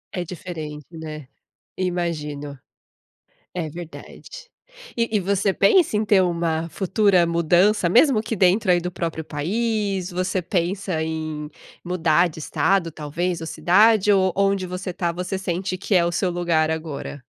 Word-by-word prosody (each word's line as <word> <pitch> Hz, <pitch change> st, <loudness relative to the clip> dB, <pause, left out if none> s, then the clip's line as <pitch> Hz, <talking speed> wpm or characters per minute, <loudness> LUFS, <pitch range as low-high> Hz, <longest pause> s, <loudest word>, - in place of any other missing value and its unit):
É 180 Hz, -, -2 dB
diferente, 155 Hz, -4 st, -7 dB
né? 155 Hz, -3 st, -8 dB, 0.5 s
Imagino. 150 Hz, -6 st, -3 dB, 1.0 s
É 170 Hz, -3 st, -3 dB
verdade. 175 Hz, -, -10 dB, 0.5 s
E 230 Hz, 0 st, +1 dB
e -, -, -1 dB
você 195 Hz, +1 st, +1 dB
pensa 220 Hz, -, +3 dB
em 215 Hz, -, +1 dB
ter 205 Hz, -2 st, +4 dB
uma 170 Hz, -2 st, -1 dB
futura 190 Hz, 0 st, +2 dB
mudança, 175 Hz, +3 st, +3 dB
mesmo 240 Hz, -, +5 dB
que 225 Hz, 0 st, -3 dB
dentro 190 Hz, +1 st, +3 dB
aí 175 Hz, -, +3 dB
do 180 Hz, -, -4 dB
próprio 165 Hz, -2 st, -4 dB
país? 195 Hz, +4 st, -2 dB
Você 185 Hz, +1 st, -1 dB
pensa 180 Hz, 0 st, -1 dB
em 155 Hz, -1 st, -4 dB, 0.4 s
mudar 175 Hz, -1 st, +2 dB
de 160 Hz, -, -11 dB
estado, 165 Hz, +4 st, +1 dB
talvez, 165 Hz, +3 st, -3 dB
ou 160 Hz, -, -6 dB
cidade? 205 Hz, +5 st, +4 dB
Ou 190 Hz, -1 st, +3 dB
onde 195 Hz, -1 st, +1 dB
você 180 Hz, +1 st, -5 dB
está, 175 Hz, -1 st, -2 dB
você 180 Hz, +2 st, -4 dB
sente 185 Hz, 0 st, -3 dB
que 200 Hz, +2 st, -1 dB
é 175 Hz, -2 st, +5 dB
o 170 Hz, -, 0 dB
seu 185 Hz, +1 st, 0 dB
lugar 170 Hz, -3 st, +1 dB
agora? 155 Hz, -3 st, -5 dB
180 Hz, 150 wpm, -22 LUFS, 160-195 Hz, 1.0 s, mesmo